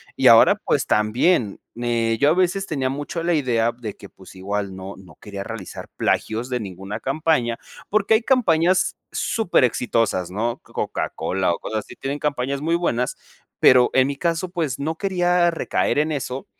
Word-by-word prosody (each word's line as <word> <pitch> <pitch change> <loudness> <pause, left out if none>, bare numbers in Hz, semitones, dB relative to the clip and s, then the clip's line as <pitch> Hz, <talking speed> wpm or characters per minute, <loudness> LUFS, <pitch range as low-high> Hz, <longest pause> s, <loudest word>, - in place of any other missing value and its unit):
Y - - +3
ahora, - - +8
pues - - -1
también, 110 - +2 0.2
eh, 115 -1 0
yo 145 - +5
a - - +4
veces 185 +2 +1
tenía 135 -4 -1
mucho 145 +5 -4
la 175 - +1
idea 120 -6 +1
de 110 -4 -6
que, 100 - -11
pues, 95 - -16
igual 100 0 -3
no 95 +1 -8
no 95 -1 -16
quería 100 -1 -6
realizar 110 -4 -8
plagios 115 +3 -1
de 125 - -1
ninguna 95 +2 -6
campaña, 135 -4 0 0.3
porque, 215 +1 +2
hay 220 - +2
campañas 185 -8 +2 0.2
súper 220 - +1
exitosas, 115 -7 0
¿no? 115 +4 -2
Coca - - -3
Cola, 95 -1 0
o, - - -5
cosas 110 - -3
así - - -11
tienen 140 +2 -4
campañas 140 -1 -2
muy 165 +2 +1
buenas, 125 -8 -1 0.4
pero, 125 -1 +6
en 130 0 +4
mi 140 - -3
caso, 170 +4 -1
pues, 160 -8 -2
no 160 +3 -2
quería 180 -3 +2
recaer 165 -2 0
en 155 +1 +1
eso 135 -2 -4
130 Hz, 175 wpm, -22 LUFS, 110-165 Hz, 0.4 s, ahora